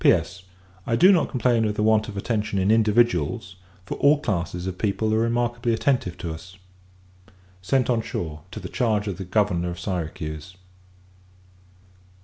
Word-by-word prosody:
P.S. 90 - +3 0.5
I 115 - +2
do 185 +9 +7
not 175 -5 +3
complain 120 -3 +2
of 105 -1 0
the 105 - 0
want 110 0 +3
of 105 -2 -7
attention 105 0 -1
in 95 +2 +2
individuals, 110 -2 +2 0.3
for - - -5
all 145 +2 +5
classes 90 - -2
of 95 -1 -5
people 110 +1 0
are 110 - +2
remarkably 120 0 0
attentive 120 -8 0
to 85 -2 -4
us. 90 +4 -11 1.0
Sent 125 +6 +1
on 120 -2 +1
shore, 80 -7 -5
to - - -7
the - - -6
charge 110 -4 0
of 100 -3 -4
the 95 - -5
Governor 90 -3 +1
of 85 0 -6
Syracuse. 80 -2 -5
105 Hz, 160 wpm, -24 LUFS, 90-115 Hz, 1.0 s, do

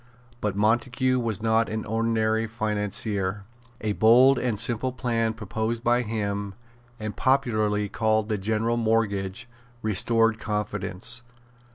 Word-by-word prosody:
But 105 -3 -2
Montague 125 +4 +1
was 115 -3 -2
not 115 0 +2
an 110 0 -3
ordinary 110 0 0
financier. 105 -2 -1 0.4
A 110 - -1
bold 125 +6 +6
and 120 -5 -1
simple 120 +2 +1
plan 115 -3 -1
proposed 110 +2 -3
by 120 +1 +3
him, 100 -3 -3 0.4
and 110 -2 -5
popularly 110 -6 +1
called 110 +1 +1
the 105 -2 -1
General 110 +3 0
Mortgage, 110 -1 0 0.4
restored 115 +2 +2
confidence. 105 +1 -2
110 Hz, 115 wpm, -25 LUFS, 105-115 Hz, 0.4 s, bold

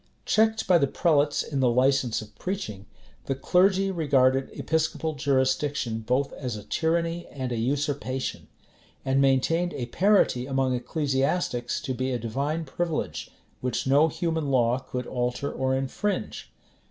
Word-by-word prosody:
Checked 220 0 +2
by 180 -2 +5
the 140 - +2
prelates 145 -1 +2
in 140 - -3
the 130 -2 +4
license 125 -2 +2
of 105 - -15
preaching, 110 - -4 0.4
the 135 - 0
clergy 190 +7 +3
regarded 135 -6 +2
episcopal 160 0 -1
jurisdiction 130 -3 0
both 125 +5 0
as 125 -4 -4
a 105 - -9
tyranny 170 +3 -1
and 130 -3 -5
a - - -1
usurpation, 135 +1 -2 0.6
and 135 +1 +2
maintained 165 +6 +2
a 125 - -3
parity 155 - +2
among 135 -1 +1
ecclesiastics 135 0 -1
to 140 -4 -3
be 130 +1 -2
a 125 - 0
divine 140 +8 -2
privilege, 165 +3 -3 0.3
which 125 -1 -2
no 140 +4 +5
human 160 -2 -2
law 125 -1 +2
could 125 -1 -5
alter 125 +3 -2
or 130 0 0
infringe. 135 +10 -3
135 Hz, 140 wpm, -26 LUFS, 130-160 Hz, 0.6 s, by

